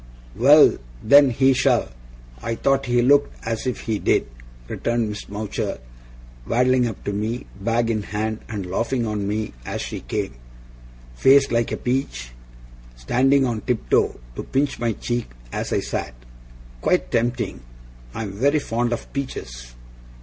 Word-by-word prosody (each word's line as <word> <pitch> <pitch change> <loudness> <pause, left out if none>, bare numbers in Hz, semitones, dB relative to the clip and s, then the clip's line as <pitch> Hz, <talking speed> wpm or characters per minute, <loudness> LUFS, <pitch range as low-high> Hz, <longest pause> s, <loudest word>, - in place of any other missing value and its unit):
'Well, - - +6 0.2
then, 140 0 +7
he 130 +2 +3
shall! - - +2 0.5
I 115 - -2
thought 135 +2 +1
he 120 0 +3
looked 145 +3 +4
as 115 +2 -2
if 125 - -2
he 110 -3 -2
did!' - - +2 0.4
returned 115 - -1
Miss 105 -1 -7
Mowcher, 105 +1 -3 0.7
waddling 125 +1 +3
up 110 - -7
to 100 - -2
me, 110 +4 -3 0.2
bag 115 +2 +1
in 110 -2 -1
hand, 110 +2 -3
and 105 -4 -4
laughing 115 +7 -1
on 105 -2 -2
me 105 +1 -2
as - - -4
she - - -4
came. 65 - -3 0.8
'Face 135 - +5
like 115 -1 +1
a - - -1
peach!' 125 - -2 0.6
standing 130 - +2
on 115 -3 -2
tiptoe 125 -3 +1 0.2
to - - -4
pinch 140 +1 -1
my 115 -1 0
cheek 120 +2 -3 0.2
as - - -3
I - - +1
sat. - - -4 0.7
'Quite - - +1
tempting! 120 +1 -1 0.5
I'm 105 -3 -4
very 140 +10 +2
fond 120 -3 -1
of 120 - -6
peaches. - - -6
115 Hz, 150 wpm, -22 LUFS, 105-130 Hz, 0.8 s, then